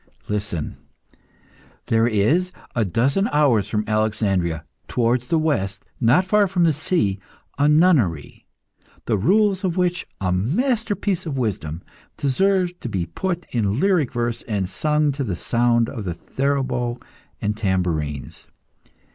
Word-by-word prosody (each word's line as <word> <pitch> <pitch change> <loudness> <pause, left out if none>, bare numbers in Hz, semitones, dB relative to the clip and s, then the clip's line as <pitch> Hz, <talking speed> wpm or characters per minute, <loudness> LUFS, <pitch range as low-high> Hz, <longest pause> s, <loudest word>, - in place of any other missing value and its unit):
Listen! 100 -7 -3 1.1
there 115 0 +3
is, 145 - +2 0.2
a 115 - +2
dozen 130 - +1
hours 125 -9 +3
from 105 -1 0
Alexandria, 100 -6 0 0.2
towards 120 +1 +1
the 165 - +2
west, 100 -12 -1
not 125 +10 +4
far 205 +1 +3
from 180 -2 +1
the 165 -2 +4
sea, 150 - 0 0.4
a 145 +1 +4
nunnery, 150 - +2 0.6
the 115 - +1
rules 195 - +2
of 185 -2 -1
which, 180 0 0
a 95 -2 0
masterpiece 205 - 0
of 140 -4 -3
wisdom, 95 -9 -3 0.3
deserve 180 +5 +1
to 120 - -5
be 95 -5 -1
put 175 - -3
in 110 -1 0
lyric 180 -8 +2
verse 120 -1 -2
and 100 -5 -1
sung 150 +7 +1
to 140 0 -3
the 100 -8 -2
sound 120 +3 +2
of 115 -6 -6
the 90 -3 -3
theorbo 130 -2 -1 0.4
and 105 +1 -1
tambourines. 90 -9 -2
120 Hz, 135 wpm, -22 LUFS, 100-170 Hz, 1.1 s, not